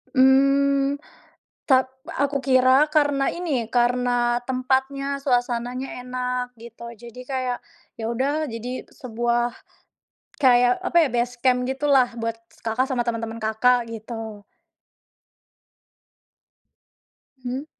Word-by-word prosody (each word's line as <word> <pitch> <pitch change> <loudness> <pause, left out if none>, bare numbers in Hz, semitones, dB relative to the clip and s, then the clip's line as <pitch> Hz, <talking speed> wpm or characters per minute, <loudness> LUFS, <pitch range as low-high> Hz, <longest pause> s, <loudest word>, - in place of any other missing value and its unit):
Mmm, 275 +1 +4 0.7
tap 260 -2 +3 0.3
aku 280 0 0
kira 260 +2 +4
karena 290 -2 +3
ini, 295 -10 -2
karena 245 0 +1
tempatnya, 265 +2 -1
suasananya 245 -1 -1
enak 250 0 -3
gitu. 235 0 -11
Jadi, 235 +2 -12
kayak, 255 -2 -2 0.4
ya 225 - -5
udah 285 +6 0
jadi 245 +1 -6
sebuah 240 0 -1 0.9
kayak, 245 0 +4
apa 345 - -2
ya, 310 - +2
base 240 +1 0
camp 250 -1 +2
gitulah 265 -2 +2
buat 230 -1 -3 0.2
s - - -23
Kakak 230 +3 0
sama 260 -3 -1
teman-teman 230 -1 -4
Kakak, 235 +2 +2
gitu. 220 -2 -7 3.0
Hmm. 255 +4 -4
250 Hz, 105 wpm, -23 LUFS, 240-270 Hz, 3.0 s, Mmm